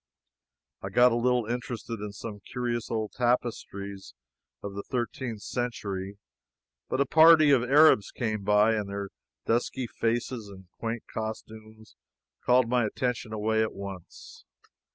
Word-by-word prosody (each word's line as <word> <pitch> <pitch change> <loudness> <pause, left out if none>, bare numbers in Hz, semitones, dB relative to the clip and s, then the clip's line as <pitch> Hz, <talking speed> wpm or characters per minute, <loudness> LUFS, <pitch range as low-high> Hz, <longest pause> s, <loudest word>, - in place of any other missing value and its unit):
I - - -5
got 125 0 +5
a - - +1
little 125 0 +1
interested 120 -1 -4
in 105 0 -5
some 105 0 -8
curious 120 -2 -2
old 110 -2 -2
tapestries 100 - -2 0.5
of 100 - -5
the 100 - -4
thirteenth 120 -2 -4
century, 100 -5 -4 0.7
but 130 - -1
a 140 - +4
party 160 +1 +7
of 135 -4 +5
Arabs 135 -4 +5
came 110 -4 -3
by, 105 +2 +4
and 105 -2 -2
their 100 0 -4 0.4
dusky 120 +2 0
faces 115 -1 -2
and 95 -1 -12
quaint 115 0 -3
costumes 110 -1 -7 0.5
called 125 -1 +4
my 125 0 +2
attention 125 0 -3
away 110 +1 0
at 110 - -1
once. 95 -3 -9
115 Hz, 135 wpm, -28 LUFS, 105-125 Hz, 0.7 s, party